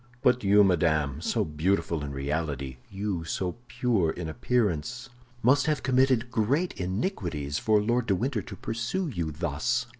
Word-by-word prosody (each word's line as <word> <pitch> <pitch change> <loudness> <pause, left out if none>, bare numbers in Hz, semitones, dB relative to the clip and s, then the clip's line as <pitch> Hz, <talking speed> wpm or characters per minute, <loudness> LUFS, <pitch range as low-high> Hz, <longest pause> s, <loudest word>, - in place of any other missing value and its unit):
But 125 -1 +3
you, 100 +1 +6
madame, 80 -6 +2
so - - 0
beautiful 80 0 0
in 70 - -4
reality, 70 -2 -3
you, 95 -3 -3
so 90 +4 -3
pure 120 -9 +1
in 80 +1 -4
appearance, 110 +2 -1 0.3
must 130 +5 +4
have 150 -4 0
committed 130 -1 +2
great 130 +10 +1
iniquities 90 - -2
for 110 -1 +3
Lord 120 +3 +1
de 100 - +3
Winter 120 +3 -1
to - - -9
pursue 120 +11 -2
you 85 - -2
thus." 85 - -1
100 Hz, 150 wpm, -28 LUFS, 80-125 Hz, 0.3 s, you